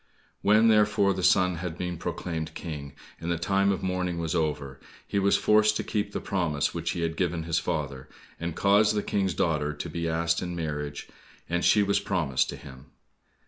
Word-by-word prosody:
When 110 +3 +5
therefore 105 -2 +4
the 95 - -4
son 90 -1 +3
had 85 -1 -5
been 90 -2 -4
proclaimed 85 -2 -4
King, 75 -4 -6 0.3
and 85 - -4
the 85 - 0
time 100 +3 +2
of 95 - -2
mourning 90 -2 -1
was 80 -2 -2
over, 75 -4 -2 0.3
he 100 - -1
was 100 0 +3
forced 110 0 +4
to - - -2
keep 105 -1 -2
the - - -3
promise 75 -6 -1
which 85 0 -3
he 85 - -3
had 80 -1 -1
given 85 -2 -1
his 80 0 0
father, 70 -4 -4 0.3
and 85 -1 -4
caused 105 +2 +4
the 105 - 0
King's 95 -4 0
daughter 75 -5 0
to 75 +3 -6
be 85 +1 -2
asked 85 +1 0
in 90 -1 -4
marriage, 75 -3 -4 0.4
and 85 +1 -1
she 105 - +5
was 100 0 +2
promised 80 -9 0
to - - -4
him. 65 0 -12
85 Hz, 195 wpm, -27 LUFS, 80-100 Hz, 0.4 s, When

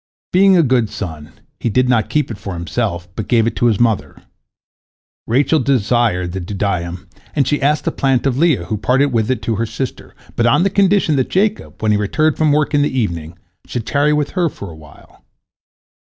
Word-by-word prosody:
Being 190 +1 +5
a 170 - +5
good 125 -5 +2
son, 80 -6 -7 0.3
he - - -1
did 125 +3 +2
not 120 -4 +1
keep 150 -5 0
it 105 - -7
for 95 -3 -6
himself, 85 +1 -3
but 110 - -4
gave 115 -3 +3
it 115 - -1
to 120 - +3
his 110 -4 +1
mother. 115 -3 0 1.1
Rachel 140 +6 +2
desired 120 -8 +1
the 95 - -4
dudaim, 90 -2 -3 0.3
and 140 -4 +2
she 145 - 0
asked 150 +2 +1
the - - +1
plant 135 -2 0
of 135 -3 +1
Leah, 150 - +2
who 110 - -3
parted 135 +4 +2
with 110 -1 +1
it 130 -4 -1
to 115 -3 -1
her 115 - 0
sister, 120 +4 -6 0.2
but 120 - +2
on 120 - +3
the 195 - +1
condition 195 -6 +2
that 130 - 0
Jacob, 210 - -1
when 110 - +2
he 105 - +2
returned 155 +9 +1
from 155 -2 +2
work 150 +1 +1
in 145 - +3
the 140 -2 0
evening, 85 -6 -3 0.3
should 120 -3 -4
tarry 145 +1 +1
with 150 -1 0
her 175 -3 0
for 100 - -9
a - - -11
while. 75 -1 -18
120 Hz, 210 wpm, -17 LUFS, 100-145 Hz, 1.1 s, Being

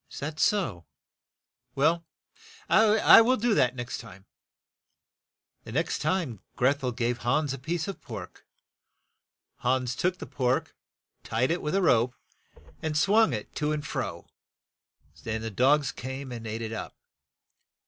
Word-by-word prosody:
"Is - - -11
that 155 +2 -5
so? 120 - +1 0.9
Well, 160 +4 +2 0.6
I 220 +1 +7
will 255 +3 +3
do 235 +1 +1
that 125 -10 +3
the - - -16
next 120 0 -4
time." 100 -4 -12 1.4
The - - -9
next 165 +6 0
time 155 - -1 0.2
Greth 135 +3 +2
el 125 - 0
gave 120 0 -1
Hans 140 +4 0
a 135 - -6
piece 160 +4 -3
of 195 - -6
pork. - - -9 1.1
Hans 125 -1 0
took 180 +7 0
the - - -7
pork, 125 -1 -1 0.5
tied 125 +6 0
it 175 - -1
with 150 +5 -2
a 195 - +2
rope, 125 -5 +3 0.7
and 155 -1 -1
swung 200 +2 +4
it 105 -3 -5
to 150 0 0
and 150 -1 -2
fro - - -4 0.9
so 80 - -20
that - - 0
the 110 0 -5
dogs 135 +6 +3
came 130 +1 -6
and 115 -2 -6
ate 110 +1 -4
it 110 0 -4
up. 110 - -6
135 Hz, 155 wpm, -27 LUFS, 120-165 Hz, 1.4 s, I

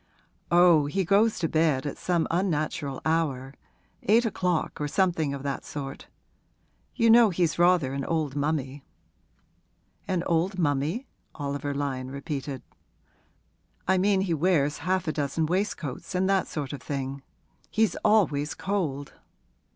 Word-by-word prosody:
'Oh, 170 -4 +5
he 190 +5 -1
goes 210 +5 +3
to 165 - 0
bed 155 -4 +1
at 145 - -3
some 175 -2 0
unnatural 155 -5 -1
hour 140 -5 0 0.5
eight 230 +4 +3
o'clock 180 -7 -1
or 150 - 0
something 165 -3 +1
of 140 -1 -5
that 140 -1 -3
sort. 135 -2 -7 0.9
You 230 - +3
know 230 -1 +7
he's 170 -2 0
rather 175 -6 +3
an 140 0 -3
old 155 -4 -1
mummy.' 145 -2 -2 1.2
'An 180 -2 0
old 175 +4 0
mummy?' 160 - 0 0.3
Oliver 145 -1 -3
Lyon 135 -2 -3
repeated. 140 -1 -5 1.2
'I 190 0 +3
mean 195 0 +3
he 185 -3 0
wears 155 -3 +1
half 185 +3 -1
a - - +2
dozen 150 +2 -1
waistcoats, 180 -3 -3
and 185 +1 +2
that 195 -1 +2
sort 145 -3 -4
of 140 - -7
thing. 135 -1 -4 0.5
He's 220 -1 +1
always 160 -9 +2
cold.' 155 -9 -3
160 Hz, 135 wpm, -27 LUFS, 140-185 Hz, 1.2 s, know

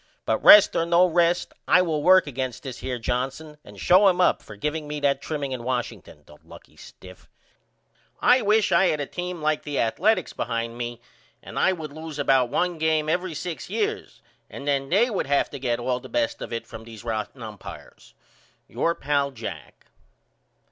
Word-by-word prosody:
But - - -1
rest 210 - +8
or - - +2
no 170 +2 +4
rest 175 0 +1
I 180 - +5
will 160 -4 -1
work 185 +4 +6
against 130 -3 -5
this 130 -3 -7
here 130 -1 -4
Johnson 135 +6 -4
and - - -14
show 190 +3 +5
him 180 -1 +2
up 180 - +3
for 105 - -12
giveing 150 +7 -3
me 150 0 -4
that 140 -1 +1
trimming 145 -3 -4
in 130 -2 -4
Washington, 115 -11 -5
the 75 - -17
lucky - - -16
stiff. 90 -1 -15 0.9
I 250 +1 +4
wish 210 0 +2
I 190 - +4
had 155 - 0
a 145 - -2
team 180 +1 -6
like 155 0 +1
the 145 -2 -5
Athaletics 190 - +1
behind 115 0 -3
me 120 0 -6 0.4
and - - -6
I 190 - +3
would 155 -5 -7
loose 160 -1 -8
about 135 -3 +2
1 175 +4 -1
game 155 -1 +1
every 175 0 -1
6 170 +1 -6
years 435 0 -3 0.3
and 140 - -9
then 135 -1 0
they 230 +7 +3
would 195 - -2
have 140 0 +1
to 140 - -7
get 120 -2 -1
all 125 +1 -2
the - - -12
best 295 0 -1
of - - -6
it 115 0 -4
from 110 - -10
these 115 -2 -12
rotten 115 +2 -4
umpires. 105 -3 -11 0.5
Your 170 - -1
pal, 140 -1 0
JACK. 110 - -9
145 Hz, 190 wpm, -24 LUFS, 125-175 Hz, 0.9 s, rest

